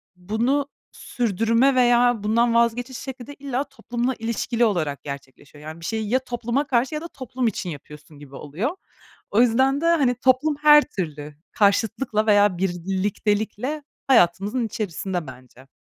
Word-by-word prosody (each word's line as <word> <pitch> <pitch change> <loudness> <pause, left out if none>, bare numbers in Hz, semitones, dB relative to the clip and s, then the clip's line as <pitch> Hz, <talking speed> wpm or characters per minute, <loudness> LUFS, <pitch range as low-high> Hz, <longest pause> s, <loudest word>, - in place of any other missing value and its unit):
bunu 235 +10 -1 0.2
sürdürme 230 +3 +1
veya 245 -2 +3
bundan 230 +2 +2
vazgeçiş 240 +2 +1
şekli 260 -2 -8
de 285 - -8
illa 275 -1 -3
toplumla 245 -2 -3
ilişkili 230 +1 0
olarak 155 -9 -1
gerçekleşiyor. 140 +1 -10
Yani 155 +2 -8
bir - - -8
şeyi 220 +1 -3
ya 255 - +3
topluma 245 +2 -2
karşı 255 +3 0
ya 300 - -3
da 335 - -6
toplum 260 -4 -4
için 195 -4 -3
yapıyorsun 150 0 -11
gibi 140 -2 -13
oluyor. 165 - -3 0.6
O 210 - +4
yüzden 265 +4 +3
de, - - -1
hani, 280 -7 +3
toplum 260 +4 +2
her 295 0 +8
türlü 150 -4 -5 0.2
karşıtlıkla 220 +2 +1
veya 205 -3 +4
bir 185 0 0
birliktelikle 210 +8 -2 0.2
hayatımızın 210 0 +3
içerisinde 190 -5 -4
bence. 130 0 -14
225 Hz, 150 wpm, -23 LUFS, 185-255 Hz, 0.6 s, her